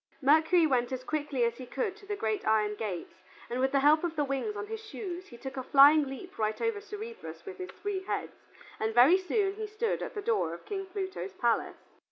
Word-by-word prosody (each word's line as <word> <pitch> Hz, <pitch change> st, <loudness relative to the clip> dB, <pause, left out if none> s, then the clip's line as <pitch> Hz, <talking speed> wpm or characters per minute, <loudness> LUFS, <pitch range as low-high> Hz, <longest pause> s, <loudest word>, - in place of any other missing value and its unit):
Mercury 320 Hz, +4 st, +5 dB
went 255 Hz, -4 st, +1 dB
as 255 Hz, -1 st, -4 dB
quickly 290 Hz, -3 st, -1 dB
as 235 Hz, 0 st, 0 dB
he 255 Hz, -, -8 dB
could 390 Hz, -, -2 dB
to 410 Hz, -1 st, -16 dB
the 415 Hz, -, -2 dB
great 220 Hz, -, -1 dB
iron 215 Hz, -1 st, +3 dB
gates, 210 Hz, -5 st, -5 dB, 0.3 s
and 245 Hz, -, -1 dB
with 265 Hz, +1 st, +2 dB
the 275 Hz, -1 st, +3 dB
help 305 Hz, +3 st, +5 dB
of 340 Hz, -2 st, -2 dB
the 295 Hz, -, +1 dB
wings 275 Hz, +10 st, -2 dB
on 415 Hz, -, -4 dB
his 445 Hz, +1 st, -6 dB
shoes, 380 Hz, -4 st, -6 dB
he 240 Hz, -, -12 dB
took 265 Hz, +2 st, -7 dB
a -, -, -1 dB
flying 285 Hz, +3 st, +7 dB
leap 270 Hz, +6 st, -9 dB
right 215 Hz, 0 st, 0 dB
over 455 Hz, -3 st, -1 dB
Cerberus 435 Hz, +2 st, -8 dB
with 390 Hz, 0 st, -8 dB
his 370 Hz, -, -5 dB
three 405 Hz, -2 st, -4 dB
heads, -, -, -3 dB, 0.5 s
and 220 Hz, +1 st, -1 dB
very 275 Hz, +10 st, +7 dB
soon 390 Hz, +1 st, 0 dB
he 435 Hz, -1 st, -4 dB
stood 430 Hz, +2 st, -2 dB
at -, -, -5 dB
the 415 Hz, -, -3 dB
door 410 Hz, -, 0 dB
of 170 Hz, -, -14 dB
King 390 Hz, -2 st, -4 dB
Pluto's 375 Hz, -, -5 dB
palace. 230 Hz, +4 st, 0 dB
310 Hz, 230 wpm, -30 LUFS, 250-405 Hz, 0.5 s, flying